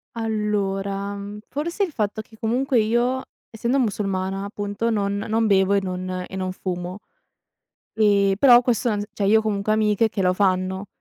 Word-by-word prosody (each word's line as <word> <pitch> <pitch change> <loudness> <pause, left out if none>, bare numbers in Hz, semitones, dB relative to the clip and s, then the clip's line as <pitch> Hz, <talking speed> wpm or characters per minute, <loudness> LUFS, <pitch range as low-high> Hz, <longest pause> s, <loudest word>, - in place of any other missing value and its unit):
Allora, 200 -3 -2
mhmm, 200 +1 -7
forse 335 +8 -2
il 370 - -2
fatto 215 -4 -2
che 220 0 -18
comunque 245 +3 +1
io, 240 +4 +1 0.3
essendo 235 +4 -1
musulmana 195 -4 -1
appunto, 205 +2 -3
non 200 -2 0
non 220 +2 0
bevo 195 -1 +3
e 200 - +3
non 185 -1 -4
e - - -9
non 185 -1 -2
fumo, 180 0 -5 0.9
ehm, 200 -2 +3
però 245 +1 +7
questo 245 -1 +1
non 210 -2 0
s - - -4
cioè 200 - -1
io 215 +3 +5
ho - - -1
comunque 215 -1 -1
amiche 215 0 +2
che 205 - -3
lo 180 -1 +3
fanno, 190 0 0
205 Hz, 175 wpm, -23 LUFS, 195-225 Hz, 0.9 s, però